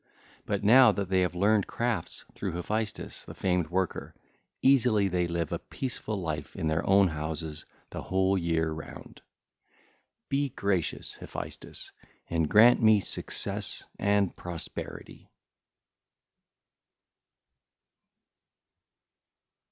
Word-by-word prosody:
But - - -1
now 125 +5 +7
that 100 -2 -3
they 95 -1 +3
have 90 -1 0
learned 100 +2 +3
crafts 115 -8 -3
through - - -4
Hephaestus 105 +5 -3
the - - -11
famed 90 -4 0
worker, 95 +1 -2 0.5
easily 125 -7 +4
they 90 -2 0
live 85 -2 -2
a - - -2
peaceful 120 -5 -4
life 80 -4 -4
in - - -3
their 80 +1 +1
own 100 -1 +6
houses 80 0 -5 0.2
the - - -5
whole 95 +1 +1
year 80 -3 0
round. 80 -1 -9
(l. - - -37 1.0
8) - - -58
Be 140 0 +1
gracious, 100 -7 -1
Hephaestus, - - -6 0.4
and 80 -2 0
grant 120 +4 +7
me 110 -2 +6
success 95 - -1 0.2
and 100 -2 +2
prosperity! 85 -2 -8
95 Hz, 115 wpm, -28 LUFS, 85-105 Hz, 1.0 s, now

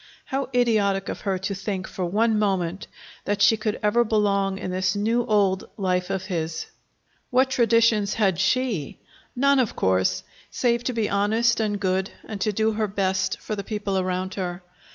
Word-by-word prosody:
How 270 0 -3
idiotic 205 -5 +2
of - - -5
her 195 -2 -1
to 190 +2 -3
think, 190 -1 -4
for 185 - -5
one 215 +5 +2
moment, 190 -3 -1 0.4
that 205 0 -1
she 225 - +6
could 215 -1 -3
ever 210 +3 +3
belong 200 -3 +1
in 185 - -5
this 185 +2 0
new 225 +4 +1
old 200 -3 +1
life 180 -2 0
of 190 -1 -2
his! 165 -4 -3 0.6
What 260 +1 +3
traditions 230 -4 +3
had 195 -6 +1
she? 195 - 0 0.4
None, 280 +2 +3
of 245 -5 0
course, 95 0 +1 0.3
save 235 -1 0
to 255 - -1
be 225 -3 0
honest 220 +4 +2
and 210 -2 -1
good 190 0 0 0.2
and 205 -3 -7
to 215 - +1
do 220 +2 +1
her 215 0 -1
best 190 -1 -1
for 215 - -4
the 200 - -5
people 205 -2 -3
around 185 0 -2
her. 180 -2 -4
205 Hz, 175 wpm, -24 LUFS, 190-220 Hz, 0.6 s, she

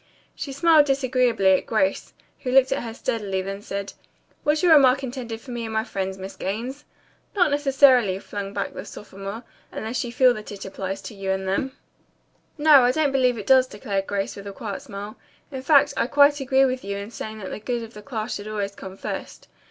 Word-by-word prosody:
She 280 - -6
smiled 300 +1 +5
disagreeably 255 -7 +2
at 185 - +2
Grace, 195 -3 0 0.3
who 255 - -4
looked 265 0 +5
at 270 - 0
her 230 - -5
steadily, 210 -5 -2
then 195 +1 -5
said, 200 -1 -5 0.5
"Was 300 +2 +1
your 345 -2 +7
remark 270 -2 +5
intended 240 -3 -5
for 260 - -10
me 240 -1 -4
and 225 - -5
my 220 0 0
friends, 190 -4 -4
Miss 190 +1 -8
Gaines?" 245 +9 -4 0.5
"Not 355 -6 +3
necessarily," 270 -8 +4
flung 200 0 -6
back 200 -1 -3
the - - -6
sophomore, 200 +2 -8 0.3
"unless 225 +2 -3
you 240 - -6
feel 250 +1 +5
that 215 -2 -8
it 200 -1 -8
applies 195 0 -5
to 190 - -8
you 195 -1 -5
and 190 0 0
to - - -6
them." 265 +7 -2 0.8
"No, 295 -2 +7
I 245 0 +4
don't 295 0 +1
believe 255 -3 +2
it 205 - -6
does," 260 +1 +5
declared 200 -3 -3
Grace 200 -1 -2
with 200 0 -9
a 200 - -6
quiet 205 -1 -6
smile. 200 +2 -8 0.3
"In 265 -2 -5
fact, 285 +1 +4
I - - +1
quite 285 +2 +5
agree 270 0 +3
with 255 -1 -2
you 200 0 -4
in 200 +2 -7
saying 220 -1 -7
that 195 -3 -7
the - - -5
good 235 +2 -3
of 225 +1 -10
the 210 - -10
class 220 -2 -4
should 205 +1 -6
always 205 -2 -3
come 190 -1 -10
first. - - -6
230 Hz, 215 wpm, -24 LUFS, 200-265 Hz, 0.8 s, your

